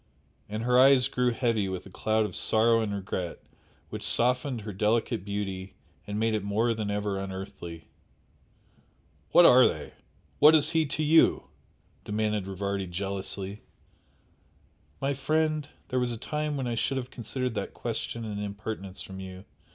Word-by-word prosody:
And 110 +2 -3
her 125 +1 +4
eyes 135 -1 +6
grew 125 -2 +1
heavy 115 -4 0
with 95 -1 -5
a 95 - -12
cloud 110 +3 +1
of - - -5
sorrow 115 +1 +3
and 110 -2 -2
regret 95 -3 -4 0.5
which - - -5
softened 125 0 +1
her 105 0 -6
delicate 105 -1 +1
beauty 95 -2 -4 0.3
and 105 +1 -3
made 110 0 +1
it 105 -2 -1
more 110 +4 +1
than 110 -2 -3
ever 100 -1 -1
unearthly. 95 -4 -7 1.4
"What 175 - +8
are 125 -3 +8
they - - -5 0.5
what 150 +2 +8
is 150 - +3
HE 160 -2 +2
to 155 - -1
you?" 160 +2 +5 0.6
demanded 105 -2 -1
Rivardi 100 0 -3
jealously. 95 +2 -4 1.4
"My 135 +1 0
friend, 155 +2 0 0.2
there 130 - +1
was 125 -1 0
a 115 - -3
time 150 +4 -2
when 135 - -2
I 120 - -1
should 135 +4 0
have 125 -1 -5
considered 125 +1 -3
that - - -4
question 115 -1 -4
an 105 -2 -4
impertinence 100 -1 -5
from 95 0 -9
you!" 95 0 -9
110 Hz, 160 wpm, -28 LUFS, 100-125 Hz, 1.4 s, What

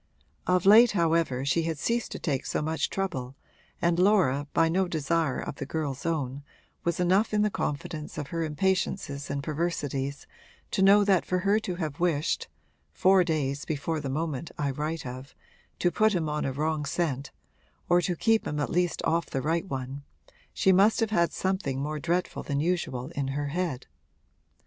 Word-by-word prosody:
Of 180 0 +2
late 220 +4 +8
however 165 -7 +1
she 155 +4 +2
had 165 -1 -2
ceased 235 - -1
to - - -4
take 140 -6 -2
so - - -1
much 160 +1 -1
trouble, 135 -10 -3 0.4
and 170 0 +1
Laura, 180 -8 +3
by 165 - +3
no 185 +3 +1
desire 160 -2 0
of 140 - -5
the - - -4
girl's 150 -1 -3
own, 140 -4 -2 0.4
was 170 0 -1
enough 190 +5 +2
in 210 - +3
the 210 - +1
confidence 150 0 -4
of 145 -2 -4
her 165 -1 -2
impatiences 155 -2 -1
and 140 0 -3
perversities 145 -3 -2 0.5
to - - 0
know 200 +2 +7
that 195 -3 +3
for 185 - -1
her 205 +2 +4
to 185 -5 -4
have 155 -5 -4
wished 165 -3 0 0.4
(four 185 - +4
days 140 -4 -1
before 155 +1 -2
the 140 -2 -4
moment 155 +1 -3
I 140 -2 0
write 150 +2 -3
of) 130 +2 -8 0.4
to 175 - +1
put 215 +3 +3
him 165 -3 0
on 150 0 -1
a 135 - -1
wrong 155 +2 -1
scent 140 -2 -2 0.6
or 175 0 +4
to 175 0 -1
keep 225 +5 +2
him 150 - -2
at 145 - -1
least 175 0 0
off 170 +1 +1
the 135 - -3
right 165 +4 0
one 135 -1 -5 0.5
she 190 - +3
must 200 +6 +5
have 225 -1 +1
had 170 -5 +2
something 185 -9 -1
more 150 +2 -3
dreadful 170 +4 -1
than 140 -1 -2
usual 150 -6 -1
in 140 -4 -2
her 145 +1 -2
head. 160 -5 -2
160 Hz, 180 wpm, -28 LUFS, 140-180 Hz, 0.6 s, late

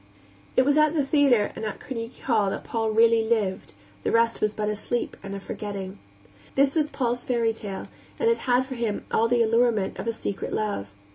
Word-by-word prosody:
It 255 - +6
was 285 +1 +3
at 305 +1 +4
the 290 -3 +2
theater 270 -7 +3
and - - -6
at 215 -2 -4
Carnegie 230 -2 -6
Hall 220 -6 +2
that - - -4
Paul 225 -1 -1
really 225 +1 +5
lived; 215 - -1 0.3
the - - -1
rest 230 0 +2
was 215 - +2
but 210 0 -3
a 210 - 0
sleep 240 +3 -3
and 195 0 -6
a - - -4
forgetting. 195 -1 -6 0.6
This 275 0 +4
was 305 -2 +2
Paul's 245 -4 -1
fairy 235 -2 +1
tale, 200 -3 -6 0.3
and 460 - +1
it 460 0 +3
had 250 +1 +4
for 260 - -6
him 230 -4 -2
all 225 - +3
the 235 0 +3
allurement 230 -4 +2
of 195 - -4
a - - +2
secret 205 -3 -4
love. 200 - -2
230 Hz, 210 wpm, -25 LUFS, 210-250 Hz, 0.6 s, It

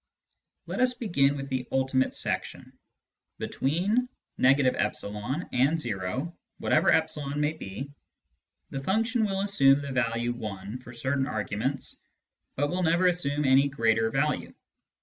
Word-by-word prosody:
Let - - -4
us 250 0 +3
begin 145 - +2
with 135 0 -6
the 130 -2 -2
" - - -38
ultimate 130 0 +1
section." - - -3 0.6
Between 200 - 0
— - - -10
e - - +7
and 130 - +1
o, 120 - -3 0.2
whatever - - +3
e 150 -3 0
may 150 +1 +1
be, 135 -1 -7 0.8
the 135 - -4
function 225 - +1
will 195 -1 -1
assume 145 -9 +4
the 140 - -5
value 120 -1 -1
i 100 0 -5
for 125 -1 -12
certain 135 +3 -1
arguments, 110 +6 -3 0.5
but 145 +2 0
will 180 +1 -1
never 170 +1 +3
assume 150 -5 +1
any 135 +1 +5
greater 115 -4 +2
value. 140 +5 -1
135 Hz, 135 wpm, -28 LUFS, 125-160 Hz, 0.8 s, e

